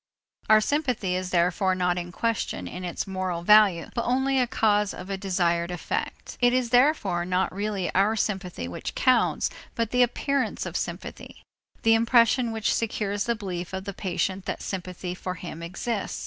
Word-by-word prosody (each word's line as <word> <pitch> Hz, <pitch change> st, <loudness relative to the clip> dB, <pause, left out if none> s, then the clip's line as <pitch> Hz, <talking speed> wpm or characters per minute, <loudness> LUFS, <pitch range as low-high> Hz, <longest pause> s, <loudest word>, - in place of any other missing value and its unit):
Our 215 Hz, 0 st, +7 dB
sympathy 250 Hz, -8 st, 0 dB
is 185 Hz, 0 st, -2 dB
therefore 180 Hz, +2 st, +2 dB
not 180 Hz, -1 st, +1 dB
in 175 Hz, 0 st, -6 dB
question 230 Hz, +4 st, -2 dB
in 180 Hz, -, -7 dB
its 175 Hz, -1 st, -3 dB
moral 185 Hz, -3 st, -3 dB
value 205 Hz, -4 st, +5 dB
but 235 Hz, -, -1 dB
only 265 Hz, +2 st, +1 dB
as 250 Hz, -, +3 dB
a -, -, -13 dB
cause 210 Hz, -3 st, +1 dB
of 185 Hz, -, -8 dB
a -, -, 0 dB
desired 175 Hz, -3 st, 0 dB
effect. 175 Hz, -2 st, -4 dB
It 245 Hz, 0 st, +4 dB
is 250 Hz, -2 st, 0 dB
therefore 250 Hz, -, +3 dB
not 180 Hz, +1 st, 0 dB
really 200 Hz, -2 st, -2 dB
our 200 Hz, +4 st, +3 dB
sympathy 190 Hz, -, -2 dB
which 85 Hz, -, -6 dB
counts 255 Hz, -2 st, +2 dB, 0.2 s
but 230 Hz, -2 st, -1 dB
the 250 Hz, -, +3 dB
appearance 270 Hz, +2 st, 0 dB
of -, -, -6 dB
sympathy, -, -, -6 dB, 0.4 s
the 225 Hz, -, +5 dB
impression 230 Hz, +1 st, +4 dB
which 220 Hz, -1 st, 0 dB
secures 205 Hz, -2 st, -1 dB
the 235 Hz, -, 0 dB
belief 185 Hz, -4 st, -5 dB
of 190 Hz, 0 st, -3 dB
the 200 Hz, 0 st, -5 dB
patient 185 Hz, 0 st, -2 dB
that -, -, -4 dB
sympathy 180 Hz, -1 st, -5 dB
for 185 Hz, 0 st, -5 dB
him 170 Hz, -2 st, -8 dB
exists. 195 Hz, +5 st, -3 dB
195 Hz, 175 wpm, -26 LUFS, 180-230 Hz, 0.4 s, Our